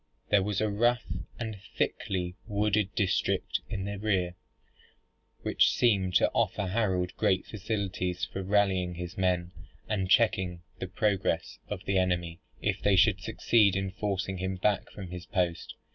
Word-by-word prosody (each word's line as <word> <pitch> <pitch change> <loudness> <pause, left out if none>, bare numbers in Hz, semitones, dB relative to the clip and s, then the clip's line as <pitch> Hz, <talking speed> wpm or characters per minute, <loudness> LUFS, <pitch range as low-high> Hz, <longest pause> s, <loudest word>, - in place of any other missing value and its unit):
There 105 -1 +5
was 100 +1 -1
a 110 - +2
rough 120 +4 +2 0.3
and 110 -4 -4 0.2
thickly 90 -2 -1
wooded 105 -1 +1
district 100 -5 +1
in 95 -4 -3
the 100 0 -4
rear, 95 -4 0 1.1
which - - +4
seemed 95 -6 +2
to - - +4
offer 100 - 0
Harold 95 -3 0
great 95 -3 +2
facilities 95 -4 -2
for 95 - -5
rallying 95 -2 +1
his 90 +1 -6
men, 90 -2 0 0.4
and 95 -4 -1
checking 95 -5 +3 0.2
the 95 - -3
progress 95 -4 0
of 100 -3 -5
the 95 -1 +2
enemy, 85 -2 -1 0.2
if - - 0
they 100 - +4
should 100 0 +4
succeed 105 -1 +3
in 95 0 -1
forcing 95 -2 -2
him 95 +1 -2
back 100 +2 0
from 95 -3 -9
his 90 0 -7
post. 85 -2 -1
95 Hz, 150 wpm, -29 LUFS, 90-105 Hz, 1.1 s, There